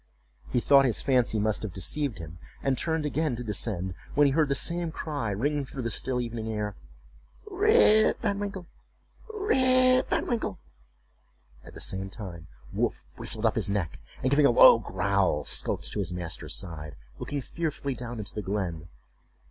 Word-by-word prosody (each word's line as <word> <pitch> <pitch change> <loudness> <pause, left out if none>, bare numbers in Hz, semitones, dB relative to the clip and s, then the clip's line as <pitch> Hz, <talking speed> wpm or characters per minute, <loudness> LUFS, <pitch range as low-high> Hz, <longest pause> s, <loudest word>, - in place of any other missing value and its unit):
He - - +1
thought 140 +3 +5
his 120 - +1
fancy 125 -4 +2
must 105 0 +1
have 110 -5 -5
deceived 130 - -1
him, 85 -1 -9 0.2
and 135 -1 +1
turned 160 +3 -1
again 150 -2 -1
to 125 - -6
descend, 100 -4 -2 0.2
when 145 - +5
he 140 - +3
heard 155 -1 +2
the 140 - +1
same 170 +1 -1
cry 145 -8 -4
ring 140 +9 -1
through 130 -1 -6
the 115 - -2
still 130 +1 -1
evening 115 -2 -4
air: 105 -2 -3 0.7
"Rip 410 - +5
Van 200 -2 -1
Winkle! 200 -3 -5 0.7
Rip 255 -11 +3
Van - - 0
Winkle!"—at 65 - -9
the - - -9
same 95 +1 -3
time 90 -6 -9 0.3
Wolf - - -1
bristled 110 +1 -1
up 110 - +3
his 110 -3 0
back, 100 -6 -2 0.2
and 130 - +1
giving 140 0 +5
a - - +3
low 115 -1 +8
growl, 100 -2 0
skulked - - -1
to - - -3
his 95 -3 -1
master's 85 -3 -4
side, 80 -5 -6 0.2
looking 145 - -3
fearfully 150 -4 -3
down 120 0 -7
into 105 -2 -6
the 105 - -4
glen. 90 -5 -3
115 Hz, 170 wpm, -27 LUFS, 95-150 Hz, 0.7 s, low